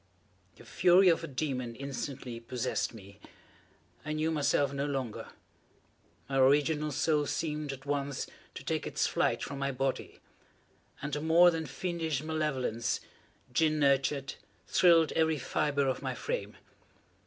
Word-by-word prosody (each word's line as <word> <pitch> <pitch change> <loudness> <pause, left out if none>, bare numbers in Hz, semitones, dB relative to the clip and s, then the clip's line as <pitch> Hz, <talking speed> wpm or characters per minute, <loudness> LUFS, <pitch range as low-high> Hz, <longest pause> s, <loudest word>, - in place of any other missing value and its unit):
The - - -16
fury 180 +1 +5
of 165 - +2
a - - -4
demon 130 -4 -3
instantly 135 -2 -5
possessed 125 +1 -2
me. 100 -3 -13 0.8
I 150 - -3
knew 155 +1 0
myself 145 -2 +1
no 140 +1 -1
longer. 130 -6 -3 1.0
My 135 -1 0
original 150 +3 +3
soul 150 +1 +1
seemed, 150 -2 -2
at 135 0 -9
once, 140 -1 -2 0.3
to - - -7
take - - -2
its - - 0
flight - - 0
from 140 -1 -5
my 140 0 0
body 135 0 -3 0.8
and 145 0 -2
a 145 - -3
more 170 +3 +6
than 160 -2 -3
fiendish 165 -3 -2
malevolence, 135 -8 -1 0.5
gin 155 +3 +3
nurtured, 140 -1 +2 0.3
thrilled 165 -3 +5
every 160 -1 +2
fibre 140 +1 0
of 130 - -1
my 130 -2 -3
frame. - - -4
145 Hz, 140 wpm, -31 LUFS, 135-155 Hz, 1.0 s, more